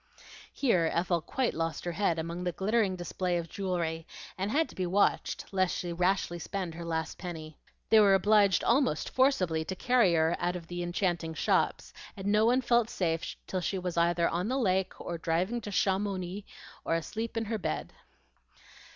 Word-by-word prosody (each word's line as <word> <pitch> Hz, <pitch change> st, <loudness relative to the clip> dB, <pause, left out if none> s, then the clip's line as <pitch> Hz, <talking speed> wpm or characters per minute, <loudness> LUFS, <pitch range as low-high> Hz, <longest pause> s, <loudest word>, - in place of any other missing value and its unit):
Here 180 Hz, -, +2 dB
Ethel 170 Hz, 0 st, +1 dB
quite 255 Hz, -, -1 dB
lost 165 Hz, +1 st, -3 dB
her 175 Hz, -, -1 dB
head 170 Hz, -2 st, +1 dB
among 170 Hz, +2 st, -4 dB
the 180 Hz, -, 0 dB
glittering 200 Hz, +1 st, +1 dB
display 175 Hz, 0 st, -2 dB
of 170 Hz, -1 st, -3 dB
jewelry, 170 Hz, -4 st, -3 dB, 0.3 s
and 190 Hz, +2 st, -2 dB
had 310 Hz, +7 st, +2 dB
to -, -, -13 dB
be 185 Hz, -1 st, -1 dB
watched 195 Hz, +3 st, +1 dB
lest 185 Hz, -2 st, +1 dB
she 175 Hz, -1 st, -3 dB
rashly 180 Hz, 0 st, 0 dB
spend 180 Hz, -1 st, -4 dB
her 170 Hz, +1 st, -7 dB
last 160 Hz, -1 st, -3 dB
penny. 160 Hz, -4 st, -7 dB, 0.3 s
They 220 Hz, -, +8 dB
were 200 Hz, -2 st, +6 dB
obliged 205 Hz, 0 st, +4 dB
almost 240 Hz, -, +2 dB
forcibly 185 Hz, -, +2 dB
to 190 Hz, +4 st, -5 dB
carry 240 Hz, -5 st, +3 dB
her 160 Hz, +1 st, +3 dB
out 175 Hz, +1 st, 0 dB
of 175 Hz, -2 st, -6 dB
the 175 Hz, +1 st, -5 dB
enchanting 175 Hz, -2 st, -1 dB
shops; -, -, 0 dB, 0.2 s
and 195 Hz, -, -7 dB
no 210 Hz, +2 st, +4 dB
one 250 Hz, +2 st, +3 dB
felt 235 Hz, -2 st, +2 dB
safe 165 Hz, -5 st, -2 dB
till 185 Hz, -, -2 dB
she 190 Hz, -, -1 dB
was 180 Hz, -2 st, -3 dB
either 170 Hz, 0 st, +3 dB
on 175 Hz, +4 st, -1 dB
the 260 Hz, +3 st, 0 dB
lake, 190 Hz, -6 st, 0 dB
or 170 Hz, -1 st, -5 dB
driving 180 Hz, +9 st, 0 dB
to 205 Hz, -, -6 dB
Chamouni, 195 Hz, -1 st, -1 dB, 0.4 s
or 165 Hz, -, 0 dB
asleep 220 Hz, +8 st, -4 dB
in 225 Hz, -, 0 dB
her 220 Hz, 0 st, -2 dB
bed. 75 Hz, -, -3 dB
185 Hz, 185 wpm, -30 LUFS, 170-205 Hz, 0.4 s, They